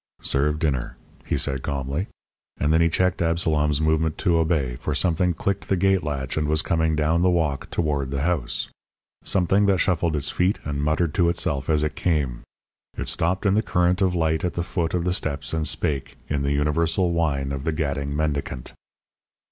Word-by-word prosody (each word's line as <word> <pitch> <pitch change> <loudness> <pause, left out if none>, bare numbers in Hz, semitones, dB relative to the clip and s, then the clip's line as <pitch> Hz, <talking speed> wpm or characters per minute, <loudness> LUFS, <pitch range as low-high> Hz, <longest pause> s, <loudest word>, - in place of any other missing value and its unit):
"Serve 75 +2 +1
dinner," 70 -6 -1 0.3
he - - 0
said 70 -2 -1
calmly. 70 - -2 0.5
And 75 +2 +2
then 80 - +4
he 85 - +4
checked 90 +2 +1
Absalom's 80 -3 +1
movement 80 0 +1
to 85 -2 +2
obey, 80 -7 0
for 75 +3 -3
something 90 +2 +1
clicked 100 +3 -2
the 95 - +3
gate 95 +1 +2
latch 70 -2 -3
and 75 -1 0
was 75 +1 +1
coming 80 -1 +1
down 80 +2 +2
the 90 - +4
walk 80 -6 0
toward 70 -5 -1
the 70 0 -2
house. 85 -7 -1 0.6
Something 95 +2 +2
that 100 -1 +3
shuffled 85 -3 +1
its 70 - 0
feet 90 +3 +1
and 70 -1 -3
muttered 75 +2 +1
to 85 -2 +3
itself 80 -6 -1
as 75 -1 +3
it 75 - -1
came. 70 -8 -1 0.6
It - - -1
stopped 90 +5 0
in 100 - +4
the 105 - +3
current 90 -1 +1
of 95 -2 +2
light 80 -1 +1
at 90 - -1
the 85 - -1
foot 85 -2 -2
of 85 - 0
the 90 - +1
steps 75 -5 -2
and 80 -1 0
spake, 70 -2 -2
in 75 -1 -1
the 70 0 0
universal 80 +5 +1
whine 70 -5 0
of 70 -1 -4
the 80 - 0
gadding 70 -2 -2
mendicant. 70 -4 -2
80 Hz, 195 wpm, -24 LUFS, 70-85 Hz, 0.6 s, then